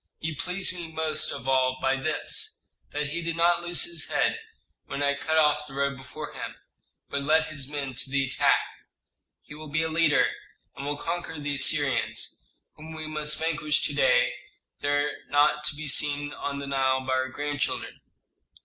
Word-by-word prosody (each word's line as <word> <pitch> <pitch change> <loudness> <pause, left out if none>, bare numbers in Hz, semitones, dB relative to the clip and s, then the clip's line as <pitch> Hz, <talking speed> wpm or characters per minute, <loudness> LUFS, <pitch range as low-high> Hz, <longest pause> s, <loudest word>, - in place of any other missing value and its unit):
He 160 0 -3
pleased 180 +6 0
me 170 -3 -6
most 155 -1 0
of 135 -2 -6
all 130 -1 +3
by 135 0 +2
this, 145 +3 -3 0.2
that 145 0 -2
he 170 +3 -3
did 170 0 -2
not 170 +1 +3
lose 175 0 +3
his 345 -1 -2
head - - +1 0.5
when 145 - -3
I 140 0 +3
cut 160 +3 -1
off 150 -1 +3
the 135 - -11
road 140 0 0
before 135 +4 -8
him, - - -6 0.6
but 140 - -1
led 155 +3 +3
his 145 -3 -3
men 140 -3 -3
to 130 - -2
the 135 0 +1
attack. 125 - +3 0.8
He - - -12
will 155 +1 -9
be 160 +3 +1
a 160 - -1
leader, 160 -2 +3 0.4
and 140 - -6
will 145 0 -1
conquer 165 -1 -4
the 145 0 -2
Assyrians, 140 -1 +2 0.3
whom 160 +1 -10
we 155 0 -5
must 150 -1 0
vanquish 155 -2 0
to - - +1
day - - +4 0.5
if - - -37
they 145 - -1
are 145 0 +2 0.2
not 145 +1 +3
to 150 - +1
be 155 +1 -6
seen 145 0 +3
on 140 0 -4
the 140 - -5
Nile 135 -1 +1
by 130 - 0
our 130 0 0
grandchildren." 145 +1 -3
145 Hz, 190 wpm, -27 LUFS, 140-160 Hz, 0.8 s, day